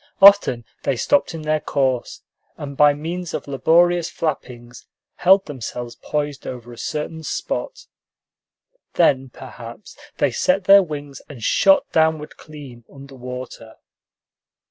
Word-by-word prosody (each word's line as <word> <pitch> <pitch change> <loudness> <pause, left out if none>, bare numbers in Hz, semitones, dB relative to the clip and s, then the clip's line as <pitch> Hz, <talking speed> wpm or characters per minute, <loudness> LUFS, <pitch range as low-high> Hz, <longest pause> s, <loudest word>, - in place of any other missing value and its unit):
Often 195 - +6 0.2
they 135 - -1
stopped 280 - +1
in 160 - -7
their 155 0 0
course, 130 -5 -2 0.3
and 140 -1 -7
by 145 +1 +6
means 170 +4 -5
of - - -6
laborious 170 +5 +2
flappings 125 -6 -5 0.3
held 190 +2 +4
themselves 120 -3 -7
poised 145 -2 -4
over 120 -1 -8
a - - -13
certain 155 +1 -4
spot. - - -4 1.1
Then, 135 -6 +2
perhaps, 120 - -11 0.2
they - - +1
set 275 -8 +1
their 195 +1 +7
wings 145 -5 -7
and 130 -6 -10
shot 195 - +4
downward 160 -1 +1
clean 140 -6 -12
under 140 0 -13
water. 125 -3 -9
145 Hz, 125 wpm, -21 LUFS, 125-165 Hz, 1.1 s, their